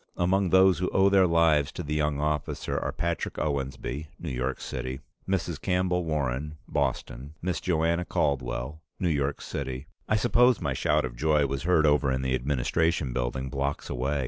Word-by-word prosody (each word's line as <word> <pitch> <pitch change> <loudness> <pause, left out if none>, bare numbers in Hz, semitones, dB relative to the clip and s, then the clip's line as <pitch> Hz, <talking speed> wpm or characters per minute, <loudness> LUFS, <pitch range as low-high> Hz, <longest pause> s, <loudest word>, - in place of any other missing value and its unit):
Among 95 +2 +2
those 95 0 +5
who 90 - 0
owe 95 +1 +4
their 95 -2 +5
lives 80 -4 +3
to 90 - -5
the 75 0 -3
young 75 -1 0
officer 75 -1 -2
are: - - -1
Patrick 85 -1 -2
Owensby, 70 0 -3
New 85 - -5
York 65 +1 -2
City; 65 +1 -5 0.3
Mrs. 85 -5 -1
Campbell 90 -2 +1
Warren, 75 -1 -2
Boston; 70 +1 -2
Miss 90 0 -2
Joanna 85 -1 +1
Caldwell, 65 0 -2 0.2
New 90 - +1
York 70 -2 -1
City 65 0 -5
" - - -30
I 110 - +3
suppose 120 +2 +4
my - - -1
shout 75 -2 +1
of - - -6
joy 75 +2 +2
was 70 0 -2
heard 80 -1 +3
over 75 -2 +3
in 65 0 -1
the 65 -1 0
Administration 70 +3 0
Building, 65 +1 -2
blocks 70 +1 -2
away. 70 +4 -1
75 Hz, 175 wpm, -27 LUFS, 65-85 Hz, 0.3 s, those